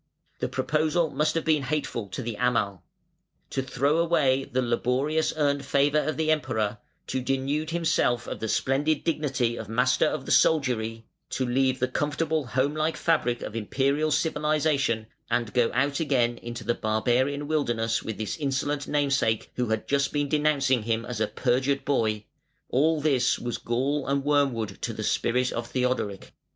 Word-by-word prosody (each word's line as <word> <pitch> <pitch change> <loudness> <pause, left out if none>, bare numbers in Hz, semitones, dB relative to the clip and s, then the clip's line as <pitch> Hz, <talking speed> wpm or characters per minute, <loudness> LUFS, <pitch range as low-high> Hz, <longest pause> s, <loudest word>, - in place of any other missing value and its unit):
The - - -1
proposal 155 +1 0
must 155 +1 0
have 165 - -1
been 155 -2 +3
hateful 135 -6 -2
to 90 - -5
the 115 -1 -4
Amal. 105 -7 0 0.7
To 135 - -1
throw 140 +4 +1
away 140 -6 +2
the 130 -1 -1
laboriously 135 +7 0
earned 140 -1 +1
favour 140 +2 +2
of 155 +1 -2
the 160 0 +2
Emperor, 115 -8 -1 0.3
to 130 - -2
denude 135 +4 -1
himself 160 -8 +1
of - - -5
the 110 - -3
splendid 140 +6 +1
dignity 135 -7 0
of - - -7
Master 120 +3 +2
of - - -3
the - - -4
Soldiery, 115 -7 +2 0.2
to 130 - -1
leave 130 +1 +1
the 130 - 0
comfortable 150 +2 -1
home 135 +3 0
like 155 +1 -1
fabric 125 -8 +1
of 105 - -6
Imperial 140 +7 0
civilisation 150 -6 +1 0.2
and 120 -2 -1
go 120 -2 +3
out 140 +3 0
again 125 -6 +1
into 120 0 -7
the 120 - +1
barbarian 125 +7 0
wilderness 120 -7 0
with 110 - -5
this 110 -2 -3
insolent 145 0 -1
namesake 140 -7 +1
who 125 -1 -1
had 110 -1 -1
just 140 0 +1
been 145 -1 0
denouncing 140 -4 +2
him 115 +1 -1
as 120 -3 -4
a 110 - +2
perjured 130 +4 0
boy: 110 -6 0 0.4
all 155 +4 +2
this 130 -4 +2
was 120 -1 -4
gall 135 +4 -1
and 140 0 0
wormwood 135 -8 0
to - - -2
the - - -5
spirit 125 +2 +1
of 115 0 -4
Theodoric. 125 -6 -2
135 Hz, 165 wpm, -26 LUFS, 120-150 Hz, 0.7 s, been